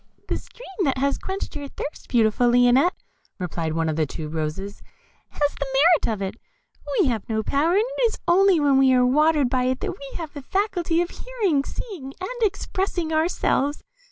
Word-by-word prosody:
"The -, -, 0 dB
stream 390 Hz, -6 st, -6 dB
that 270 Hz, -2 st, +1 dB
has 280 Hz, +1 st, 0 dB
quenched 385 Hz, -3 st, -5 dB
your 290 Hz, -1 st, -5 dB
thirst, 290 Hz, -, -7 dB
beautiful 235 Hz, +1 st, +3 dB
Lionette," 245 Hz, +7 st, +4 dB, 0.4 s
replied 165 Hz, -3 st, -3 dB
one 165 Hz, 0 st, 0 dB
of 155 Hz, -, -1 dB
the 155 Hz, -2 st, +1 dB
tube 155 Hz, +1 st, -6 dB
roses, 165 Hz, +6 st, -4 dB, 0.5 s
"has 290 Hz, -1 st, -1 dB
the 280 Hz, -, -2 dB
merit 330 Hz, -5 st, +4 dB
of 200 Hz, -, -5 dB
it; 195 Hz, +3 st, -4 dB, 0.6 s
we 385 Hz, -, +5 dB
have 230 Hz, -5 st, -2 dB
no 220 Hz, -1 st, 0 dB
power, 290 Hz, +9 st, +1 dB
and 410 Hz, +3 st, +4 dB
it -, -, -5 dB
is 445 Hz, -, -5 dB
only 370 Hz, 0 st, +5 dB
when 280 Hz, -2 st, +4 dB
we 265 Hz, -1 st, +5 dB
are 250 Hz, -1 st, +4 dB
watered 300 Hz, +2 st, +3 dB
by 250 Hz, 0 st, 0 dB
it 255 Hz, 0 st, 0 dB
that -, -, -2 dB
we 275 Hz, -1 st, -9 dB
have 325 Hz, -4 st, -6 dB
the 285 Hz, -, -7 dB
faculty 350 Hz, 0 st, 0 dB
of 350 Hz, -, -7 dB
hearing, 410 Hz, -, -1 dB
seeing, 285 Hz, -, -7 dB
and 485 Hz, +7 st, -5 dB
expressing 380 Hz, -5 st, -1 dB
ourselves. 315 Hz, -3 st, 0 dB
285 Hz, 190 wpm, -23 LUFS, 245-355 Hz, 0.6 s, we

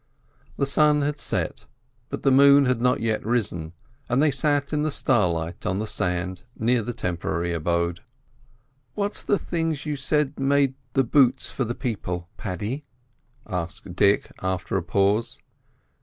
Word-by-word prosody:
The 140 Hz, -, +1 dB
sun 150 Hz, +1 st, +4 dB
had 145 Hz, +1 st, -2 dB
set, -, -, -2 dB, 0.4 s
but -, -, -5 dB
the 135 Hz, -, +4 dB
moon 140 Hz, +1 st, +7 dB
had 125 Hz, -2 st, +1 dB
not 125 Hz, +1 st, +2 dB
yet 110 Hz, -1 st, 0 dB
risen 90 Hz, -9 st, -1 dB, 0.4 s
as 125 Hz, +2 st, +2 dB
they 150 Hz, 0 st, +4 dB
sat 145 Hz, +1 st, +1 dB
in 150 Hz, -, +1 dB
the 155 Hz, -, +1 dB
starlight 90 Hz, -, 0 dB
on 95 Hz, -, -1 dB
the 110 Hz, -, -2 dB
sand 90 Hz, -2 st, -1 dB, 0.2 s
near 120 Hz, +2 st, +2 dB
the 115 Hz, +3 st, -4 dB
temporary 85 Hz, -5 st, -2 dB
abode. 85 Hz, +1 st, 0 dB, 1.0 s
"What's 205 Hz, 0 st, -2 dB
the 205 Hz, -, +1 dB
things 165 Hz, -5 st, -2 dB
you 150 Hz, -1 st, -2 dB
said 145 Hz, +1 st, 0 dB
made 135 Hz, 0 st, +2 dB, 0.2 s
the 135 Hz, -, +3 dB
boots 130 Hz, 0 st, +3 dB
for 135 Hz, -, -2 dB
the 120 Hz, +2 st, -3 dB
people, 90 Hz, -8 st, -4 dB
Paddy?" 105 Hz, -, -4 dB, 0.6 s
asked 90 Hz, 0 st, -5 dB
Dick, 100 Hz, +2 st, +3 dB
after 95 Hz, +1 st, -2 dB
a 95 Hz, -, +2 dB
pause. 100 Hz, +6 st, +1 dB
120 Hz, 155 wpm, -24 LUFS, 90-140 Hz, 1.0 s, moon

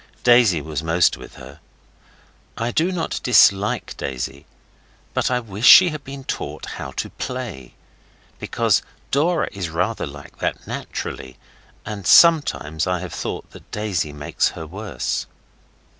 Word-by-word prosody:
Daisy 120 Hz, -9 st, +5 dB
was 80 Hz, 0 st, -4 dB
most 80 Hz, +1 st, +2 dB
with -, -, -12 dB
her. 70 Hz, +2 st, -12 dB, 1.0 s
I 115 Hz, +1 st, -1 dB
do 170 Hz, +8 st, +1 dB
not 175 Hz, -3 st, -2 dB
dislike 105 Hz, -4 st, +3 dB
Daisy, 65 Hz, +1 st, -5 dB, 0.7 s
but -, -, +1 dB
I 125 Hz, -1 st, +1 dB
wish 110 Hz, 0 st, -1 dB
she 185 Hz, -1 st, +10 dB
had 155 Hz, -3 st, -6 dB
been 135 Hz, 0 st, -8 dB
taught -, -, -5 dB
how 70 Hz, -, -6 dB
to -, -, -4 dB
play. 120 Hz, -, -6 dB, 0.6 s
Because -, -, +1 dB, 0.3 s
Dora 165 Hz, +4 st, +2 dB
is 90 Hz, -4 st, -4 dB
rather 90 Hz, +5 st, -1 dB
like 70 Hz, 0 st, -12 dB
that -, -, -3 dB
naturally, 65 Hz, -1 st, -6 dB, 0.5 s
and 100 Hz, -4 st, -5 dB
sometimes 120 Hz, -, +5 dB
I 90 Hz, -1 st, 0 dB
have 90 Hz, -3 st, -7 dB
thought -, -, -5 dB
that -, -, -15 dB
Daisy 95 Hz, -8 st, -2 dB
makes 75 Hz, 0 st, -1 dB
her 80 Hz, -, -6 dB
worse. 95 Hz, -, -4 dB
95 Hz, 140 wpm, -21 LUFS, 75-125 Hz, 1.0 s, she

